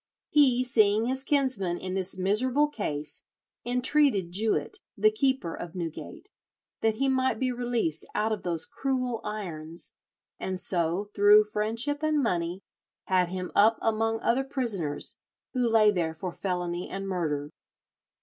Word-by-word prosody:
He, 260 -4 +4
seeing 215 -3 +3
his 260 +2 -2
kinsman 260 -12 0
in 185 0 -5
this 190 0 -2
miserable 250 +10 +2
case, 150 - -4 0.4
entreated 250 - +2
Jewet, 215 +4 -1 0.2
the 430 - +4
keeper 265 - 0
of 175 +1 -7
Newgate, 165 -3 -7 0.5
that 220 -1 +2
he 275 +4 0
might 260 0 +1
be 260 -1 +1
released 240 -10 -1
out 220 +1 +1
of 215 -3 -2
those 170 -3 -1
cruel 255 -4 -2
irons, 170 -6 -5 0.5
and 185 -1 -3
so, 180 +3 0
through 205 +1 +7
friendship 225 +7 -2
and 310 -1 +1
money, 175 -3 -1 0.5
had 180 -2 +3
him 185 0 -4
up 220 +2 +5
among 225 0 0
other 255 +3 +2
prisoners, 220 - -3 0.4
who 250 -3 +1
lay 215 -2 +5
there 165 -4 -1
for 180 +2 -5
felony 175 -1 -3
and 195 0 -5
murder." 150 -6 -2
210 Hz, 140 wpm, -28 LUFS, 180-250 Hz, 0.5 s, through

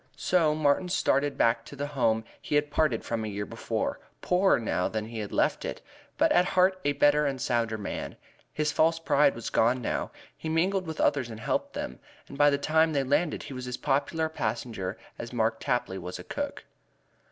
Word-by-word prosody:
So 165 -4 +2
Martin 155 +4 +2
started 145 -5 +1
back 115 0 +3
to 145 - -10
the 140 +1 -3
home 115 -6 +1 0.2
he - - -2
had 145 0 +2
parted 145 -7 +1
from 115 -1 -2
a - - -3
year 105 0 -3
before, - - -3 0.2
poorer 180 -5 +3 0.3
than 110 0 -3
he 115 -1 -6
had 105 -2 -5
left - - +1
it, - - -4 0.4
but - - +3
at 180 - +5
heart 185 +1 +2
a 145 - +2
better 145 +1 +4
and 135 -1 -2
a - - -13
sounder 115 -2 0
man. 105 - -5 0.4
His 150 0 0
false 165 +2 +3
pride 150 -3 +3
was 115 - -5
gone 120 +3 +3
now. 120 - -2 0.3
He 160 - -6
mingled 185 +3 +1
with 160 - -5
others 130 -4 +2
and 110 -1 -8
helped - - -1
them, 65 - -5 0.3
and - - -10
by 145 +1 +5
the 140 - +2
time 160 +2 +2
they 140 -2 +2
landed 150 +4 0
he - - -8
was 130 -1 -6
as 125 0 -4
popular 145 +3 0
a - - -2
passenger 110 -11 -3 0.2
as 115 - -6
Mark 110 -2 0
Tapley 120 -8 -1
was 90 0 -6
a - - -9
cook. - - -5
140 Hz, 210 wpm, -28 LUFS, 115-155 Hz, 0.4 s, at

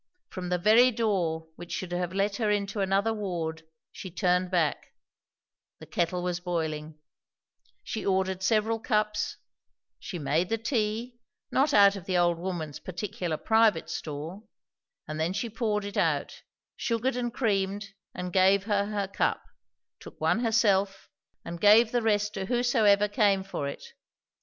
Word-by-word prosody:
From 180 -2 -6
the 180 - +1
very 220 +7 +6
door 180 -9 -1
which 175 0 -10
should 185 -2 -4
have 175 -1 -2
let 200 +1 0
her 220 -3 0
into 205 0 -1
another 195 +3 +1
ward, 170 -6 -3 0.3
she 190 - -8
turned 180 0 +1
back 170 -5 -1 0.8
The - - -10
kettle 175 +1 -1
was 180 -1 -2
boiling; 160 -3 -3 0.9
she 220 - -4
ordered 190 -1 0
several 220 +2 +1
cups; 215 -2 -1 0.6
she 180 - -6
made 160 +4 0
the 225 - +1
tea, 230 +1 -2 0.3
not 275 +3 +2
out 200 -1 +6
of 195 - -8
the 185 -2 0
old 175 -1 +2
woman's 170 -5 -4
particular 180 -3 -4
private 220 -5 +2
store; 155 +6 -6 0.7
and 155 0 -5
then 165 +3 0
she 230 +3 -3
poured 210 -2 -1
it 205 +2 -6
out, - - 0 0.3
sugared 235 +2 -1
and 240 -1 -2
creamed 200 -4 -1 0.2
and 180 -1 -5
gave 190 +1 +4
her 200 -1 0
her 205 -2 -2
cup; 195 - -1 0.6
took - - -13
one 160 +6 +2
herself, 205 -4 +1 0.4
and 170 0 -7
gave 220 +2 +6
the 245 - +1
rest 210 -2 +1
to 195 -2 -4
whosoever 225 -4 +3
came 205 -2 +2
for 180 -7 -4
it. 140 - -7
195 Hz, 150 wpm, -28 LUFS, 175-215 Hz, 0.9 s, very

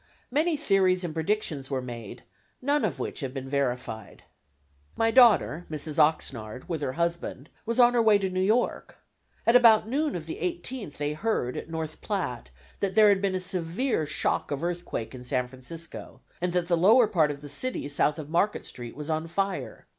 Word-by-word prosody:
Many 310 +4 +2
theories 190 -9 +2
and 170 -3 -3
predictions 160 -5 -1
were 135 -2 -1
made, 120 -4 -8 0.4
none 285 +3 +1
of - - -1
which - - -4
have 135 -2 -5
been 135 0 -5
verified. 125 -6 -3 0.7
My 225 0 +2
daughter, 225 - +5
Mrs. 155 0 -4
Oxnard, 130 -6 0
with 165 -4 -3
her 130 -3 -2
husband 170 -3 -2 0.2
was 230 +2 -1
on 245 0 +7
the 240 - +4
way 215 -2 +5
to 195 -1 -1
New 185 0 -1
York. 220 +6 0 0.5
At 230 - +4
about 230 -3 +7
noon 290 +5 0
of 165 -3 -5
the 160 - -6
18th 180 - -4
they 145 0 -1
heard, 155 - -1
at - - -6
North 160 -1 -5
Platte, 140 - -3 0.3
that 195 -1 -1
there 215 -1 +7
had 200 -1 +3
been 195 -2 0
a - - 0
severe 180 - -1
shock 155 - -1
of 145 +2 -3
earthquake 175 -10 -3
in 125 -1 -9
San 125 0 0
Francisco, 135 +7 -9 0.2
and 180 0 0
that 175 -1 +1
the 175 - +3
lower 220 +8 +6
part 170 -8 +2
of 140 -1 -5
the 145 - -8
city 195 - -2
south 145 +1 +1
of 155 -3 -6
Market 170 +7 0
Street 120 -1 -8
was 150 0 -7
on 155 +1 -1
fire. 195 +3 -3
170 Hz, 190 wpm, -27 LUFS, 145-210 Hz, 0.7 s, on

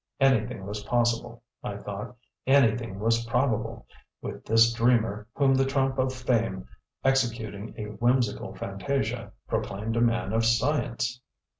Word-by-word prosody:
Anything 120 -8 +2
was 105 +1 -5
possible, 120 +1 0 0.2
I 100 - -4
thought 105 +3 -6 0.3
anything 115 -6 +3
was 115 +2 +2
probable 115 -2 0 0.3
with - - -7
this 115 +1 +5
dreamer 115 -3 +2
whom 135 -2 +4
the 135 0 +3
trump 135 0 0
of 130 0 +2
Fame, 115 -7 -1 0.4
executing 115 -6 0
a 110 - -4
whimsical 115 -2 0
fantasia, 115 +4 -2 0.2
proclaimed 110 +3 -2
a 115 - +2
man 115 -2 +1
of 115 +1 +2
science! 120 0 +1
115 Hz, 130 wpm, -27 LUFS, 110-125 Hz, 0.4 s, this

